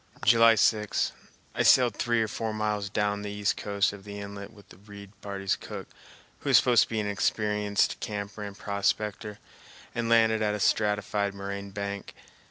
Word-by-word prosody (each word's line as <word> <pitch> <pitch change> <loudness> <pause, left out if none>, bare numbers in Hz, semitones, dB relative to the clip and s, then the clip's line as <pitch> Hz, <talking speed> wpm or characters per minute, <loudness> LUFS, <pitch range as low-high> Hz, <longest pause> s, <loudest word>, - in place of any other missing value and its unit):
July 115 -1 +6
6. 105 0 +1 0.4
I - - -1
sailed 125 -2 +5
three 120 -1 +1
or - - -2
four 110 0 -4
miles 105 -2 -2
down 105 0 -1
the 105 - -5
east 105 0 -1
coast 100 0 0
of 100 -1 -11
the 100 0 -8
inlet 100 0 -8
with 105 -3 -18
the - - -15
Reid 100 0 -12
party's 100 -1 -2
cook, - - -8 0.5
who - - -4
is - - +7
supposed 120 -3 +5
to - - -25
be 110 - -2
an 105 - -2
experienced 105 0 0
camper 105 0 -5
and 100 -1 -7
prospector, 105 +1 -2 0.6
and 115 -1 -2
landed 110 -1 +4
at 105 -1 +1
a - - -4
stratified 105 -1 0
moraine 100 0 -6
bank. 100 0 -6
105 Hz, 175 wpm, -27 LUFS, 100-110 Hz, 0.6 s, is